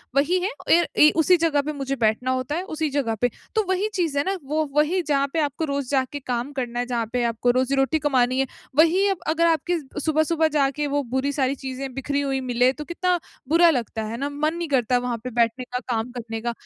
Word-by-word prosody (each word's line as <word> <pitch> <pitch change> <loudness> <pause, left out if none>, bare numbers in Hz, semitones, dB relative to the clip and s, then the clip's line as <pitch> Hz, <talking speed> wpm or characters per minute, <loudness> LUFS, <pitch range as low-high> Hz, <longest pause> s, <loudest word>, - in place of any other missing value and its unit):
वही 320 +7 +3
है। 375 +3 -1 0.3
एर 345 - +1
ए 300 - +8
उसी 360 +2 +5
जगह 315 -3 +2
पे - - -2
मुझे 275 -1 -3
बैठना 220 +4 +1
होता 260 +3 -2
है, 355 - -2
उसी 310 0 -1
जगह 270 -6 -1
पे। 245 - +3 0.3
तो 435 - +3
वही 380 +3 +1
चीज़ 330 -6 -1
है 285 - +3
ना, 385 0 -1
वो 305 +3 -1
वहीं, 310 +5 +2
जहाँ 280 -1 +2
पे 330 - +1
आपको 300 +1 -1
रोज़ 280 -2 -2
जाके 275 +1 0
काम 245 +3 -2
करना 240 -1 -3
है, 245 - 0
जहाँ 240 -2 -1
पे 245 -1 +1
आपको 235 +2 +1
रोज़ी-रोटी 270 +4 +1
कमानी 255 -2 +2
है, 270 - +1 0.3
वहीं 345 +6 +4
अब 385 - -3 0.2
अगर 335 +1 +3
आपकी 330 +1 +1
अ, 295 -3 -4
सुबह-सुबह 315 +1 +2
जाके 285 +1 +1
वो 285 - +1
बुरी 275 +2 +1
सारी 270 +1 +1
चीज़ें 265 0 -5
बिखरी 280 +2 -2
हुई 270 -1 -1
मिलें, 245 +2 +3
तो 300 +2 -8
कितना 355 +1 0 0.3
बुरा 335 +1 +6
लगता 225 -1 -5
है 230 - -4
ना। 280 +3 -2
मन 305 +3 -1
नहीं 340 -1 -3
करता, 245 +1 +1
वहाँ 240 -1 -1
पे 255 - -4
बैठने 230 +2 0
का, 250 0 -4 0.2
काम 225 +2 -2
करने 230 -2 -6
का। 240 +1 -1
280 Hz, 235 wpm, -23 LUFS, 255-315 Hz, 0.3 s, ए